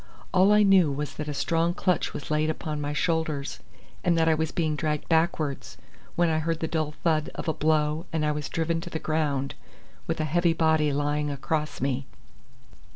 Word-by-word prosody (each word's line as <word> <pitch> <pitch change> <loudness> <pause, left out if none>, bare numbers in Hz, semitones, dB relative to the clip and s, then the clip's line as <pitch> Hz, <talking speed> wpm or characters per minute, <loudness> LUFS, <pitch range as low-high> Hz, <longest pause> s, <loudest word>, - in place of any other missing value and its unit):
All 190 +2 +5
I 210 0 +6
knew 190 -6 +5
was 145 +1 -3
that 150 - -5
a 150 - -2
strong 165 +3 +1
clutch 180 -3 0
was 145 - -7
laid 155 +1 +2
upon 155 -1 -3
my 145 0 -2
shoulders, 155 -2 -1 0.4
and 170 -2 +3
that 165 0 +3
I 160 - +5
was 160 0 -1
being 160 -4 0
dragged 150 -1 -2
backwards, 160 -3 0 0.4
when 175 0 +3
I 160 -1 +1
heard 165 +1 -1
the 160 - -1
dull 155 -2 -1
thud 155 -3 +2
of - - -5
a 160 - +2
blow 155 +2 +1
and 160 -3 0
I 150 - +2
was 150 0 -4
driven 165 0 -1
to 175 - -7
the 160 - -3
ground, 150 -4 -1 0.5
with - - -2
a 155 - +1
heavy 170 +2 +2
body 160 -2 +2
lying 145 +1 0
across 150 +2 -2
me. 135 0 -1
155 Hz, 200 wpm, -26 LUFS, 150-165 Hz, 0.5 s, I